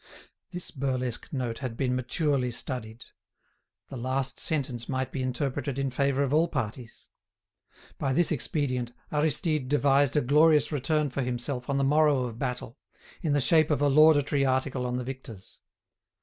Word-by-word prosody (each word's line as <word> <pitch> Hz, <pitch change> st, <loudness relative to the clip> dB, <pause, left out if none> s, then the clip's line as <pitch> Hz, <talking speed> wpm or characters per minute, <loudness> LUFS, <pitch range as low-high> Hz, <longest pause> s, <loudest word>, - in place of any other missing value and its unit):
This 180 Hz, -1 st, -6 dB
burlesque 130 Hz, -4 st, -3 dB
note 125 Hz, -5 st, -3 dB
had 125 Hz, -4 st, -5 dB
been 125 Hz, -2 st, 0 dB
maturely 130 Hz, +1 st, 0 dB
studied. 120 Hz, -2 st, -4 dB, 0.8 s
The 135 Hz, -, -7 dB
last 130 Hz, +1 st, -2 dB
sentence 130 Hz, -6 st, -1 dB
might 130 Hz, -1 st, -2 dB
be 135 Hz, -, -3 dB
interpreted 130 Hz, +1 st, -2 dB
in 135 Hz, -1 st, -1 dB
favour 140 Hz, +1 st, +1 dB
of 140 Hz, 0 st, -1 dB
all 160 Hz, +3 st, +4 dB
parties. 120 Hz, -5 st, -5 dB, 0.9 s
By 135 Hz, -, 0 dB
this 170 Hz, +6 st, +2 dB
expedient, 130 Hz, -4 st, -2 dB, 0.2 s
Aristide 150 Hz, -2 st, 0 dB
devised 140 Hz, 0 st, +3 dB
a -, -, +4 dB
glorious 150 Hz, +3 st, +4 dB
return 150 Hz, 0 st, 0 dB
for 135 Hz, -, -2 dB
himself 125 Hz, +1 st, -3 dB
on 140 Hz, -, +1 dB
the 140 Hz, -, +1 dB
morrow 145 Hz, -1 st, +3 dB
of 120 Hz, -2 st, -6 dB
battle, 125 Hz, -1 st, -4 dB, 0.4 s
in 155 Hz, -4 st, 0 dB
the 145 Hz, -, +3 dB
shape 155 Hz, +3 st, +3 dB
of 150 Hz, -4 st, +1 dB
a 145 Hz, 0 st, +3 dB
laudatory 145 Hz, -1 st, +5 dB
article 130 Hz, -1 st, 0 dB
on 125 Hz, 0 st, -2 dB
the 125 Hz, -, -3 dB
victors. 120 Hz, -6 st, -9 dB
135 Hz, 160 wpm, -27 LUFS, 125-145 Hz, 0.9 s, laudatory